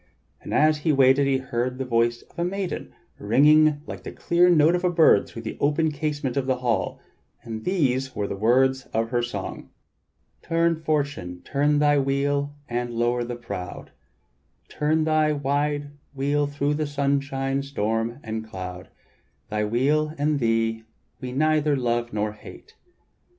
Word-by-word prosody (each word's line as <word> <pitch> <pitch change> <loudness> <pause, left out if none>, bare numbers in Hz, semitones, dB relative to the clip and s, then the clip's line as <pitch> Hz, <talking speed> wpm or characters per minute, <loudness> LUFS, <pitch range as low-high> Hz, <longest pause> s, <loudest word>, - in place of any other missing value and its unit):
And - - -9
as 155 0 +3
he 155 +2 +1
waited 135 0 +4
he 135 -1 +2
heard 125 -1 -3
the 130 - -3
voice 120 -1 +1
of - - -15
a - - +1
maiden 190 +1 -3 0.3
ringing 150 +6 +4
like - - -7
the - - -7
clear 175 +1 +3
note 160 -1 +5
of 180 0 -1
a 180 - +3
bird 165 - +4
through 115 - -9
the 110 - -6
open 150 +2 +1
casement 145 -3 -3
of 135 -2 -1
the 130 - +2
hall, 125 -3 -1 0.4
and 110 -2 -7
these 135 -8 0
were 105 - -1
the 100 - -4
words 130 +5 +2
of 115 +1 0
her 120 -1 +1
song: 105 -5 -5 0.7
"Turn, 165 0 +1
Fortune, 140 - -2
turn 145 +1 +1
thy 145 -1 +4
wheel 140 +1 0 0.2
and 120 0 -2
lower 120 +1 0
the 120 0 -5
proud; 100 -7 -7 0.8
Turn 155 +1 0
thy 155 -1 +2
wild 145 +1 0 0.3
wheel 145 +2 +1
thro' 145 0 -1
sunshine, 140 -1 -1
storm, 115 -2 -2
and 110 0 -4
cloud; 95 -4 -8 0.6
Thy 105 0 0
wheel 150 +7 +1
and 145 0 +1
thee 115 -1 +1 0.4
we 125 - -6
neither 155 +1 +2
love 120 -1 -1
nor 105 0 -1
hate. 440 - -14
135 Hz, 155 wpm, -24 LUFS, 120-150 Hz, 0.8 s, note